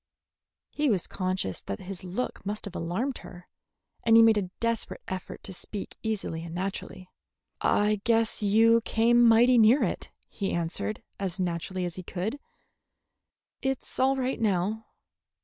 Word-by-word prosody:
He 295 -1 +1
was 195 -6 +1
conscious 185 - -2
that 100 - -5
his 185 0 -6
look 185 +8 -4
must 210 +2 -4
have 195 -3 -8
alarmed 205 +11 -2
her, 175 0 -12 0.5
and 225 0 +5
he 230 - +9
made 225 -1 +6
a 185 -3 -4
desperate 230 -1 -2
effort 185 -1 -6
to 190 - -7
speak 200 +2 -6
easily 200 -7 -3
and 170 0 -7
naturally. 185 0 -5 0.5
"I 210 0 +2
guess 230 -1 +2
you 225 +3 +5
came 235 +2 +4
mighty 235 +2 +6
near 225 +6 +6
it," - - -2 0.2
he 195 -2 -3
answered, 170 +5 -2 0.2
as 190 -1 -3
naturally 180 +1 -2
as 175 0 -5
he - - -4
could. 195 +10 -4 1.2
"It's 265 -1 -3
all 265 +1 +4
right 260 0 -1
now." 210 +1 0
205 Hz, 150 wpm, -28 LUFS, 185-230 Hz, 1.2 s, he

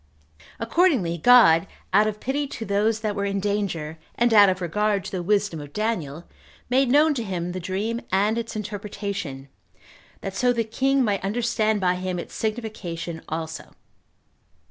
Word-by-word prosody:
Accordingly, 230 - +2
God, 195 -5 +6 0.3
out 215 - +5
of 210 -1 -3
pity 280 +4 -2
to 230 -4 -6
those 210 +2 +1
that 215 -2 -2
were 200 - -2
in 200 0 -1
danger, 190 -6 -2 0.2
and 240 -1 +2
out 205 -2 +8
of 185 0 -1
regard 200 +3 0
to - - -6
the 185 - -3
wisdom 200 -3 0
of 145 0 -11
Daniel, 175 -9 -2 0.5
made 260 0 +3
known 300 +4 +5
to 240 -5 -3
him 180 -4 -3
the 185 - -4
dream 200 +6 -2
and 205 +3 +2
its 230 -1 -4
interpretation, 200 -9 -5 0.7
that 195 0 -5
so 245 +4 +2
the 235 -1 0
king 265 +4 +1
might 205 -4 0
understand 220 0 0
by 180 -1 +3
him 185 0 -3
its 175 - -7
signification 210 -7 -4
also. 160 0 -5
205 Hz, 165 wpm, -24 LUFS, 180-225 Hz, 0.7 s, out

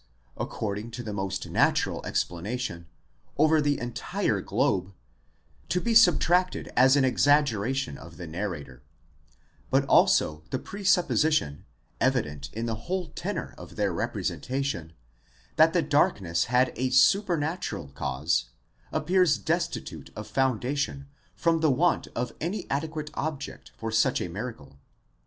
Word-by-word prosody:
according 105 +1 -4
to 120 +1 -7
the 110 -2 -5
most 95 -1 -3
natural - - +1
explanation, 90 -1 -3 0.5
over 155 +1 +4
the 145 -1 +1
entire 120 0 -2
globe, 95 +1 0 0.8
to 180 - +1
be 235 +4 0
subtracted 180 -3 +4
as 130 +2 +6
an 140 -2 +4
exaggeration 130 - +2
of 85 -1 -12
the 90 - -7
narrator 80 -7 -5 0.5
:* - - -35
but - - +3
also 75 0 +4
the - - -1
pre 200 +9 -8
supposition, 160 - +2 0.3
evident 70 -2 0
in 115 +2 -4
the 115 +4 -5
whole 185 -2 -1
tenor - - -4
of - - -11
their - - 0
representation, 130 - -3 0.6
that 160 +1 +6
the 170 -1 +2
dark 145 -6 +3
ness 85 -3 0
had 125 +2 +2
a 130 +1 0
supernatural 155 - +2
cause, 70 +4 -1 0.5
appears 170 -1 +3
destitute 100 - -3
of 105 - -6
foundation 135 +3 -1 0.3
from 165 -1 +2
the 160 -1 +3
want 160 +7 +2
of 125 +1 -2
any 180 +4 -2
adequate 155 +1 -3
object 150 -2 -5
for 115 0 -4
such 110 0 +2
a - - -3
miracle. 85 - -7
130 Hz, 135 wpm, -27 LUFS, 95-155 Hz, 0.8 s, as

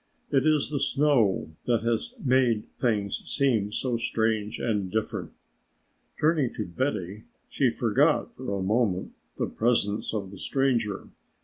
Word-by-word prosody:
It 140 +1 +3
is 150 -1 +3
the 145 - -1
snow 135 - +2 0.2
that 115 -3 +2
has 120 - -1
made 125 -4 +3
things 105 -5 +1
seem 115 -7 +1
so 120 +2 -1
strange 110 -1 0
and 105 -5 -1
different!" 110 0 -2 0.9
Turning 150 -5 +2
to 110 - -3
Betty 100 -2 -3 0.2
she - - +2
forgot - - +1
for 100 - -3
a 95 - -2
moment 100 -2 0 0.3
the - - 0
presence 110 -3 0
of 100 -3 -4
the 100 - -10
stranger. 125 -7 0
115 Hz, 135 wpm, -27 LUFS, 105-130 Hz, 0.9 s, It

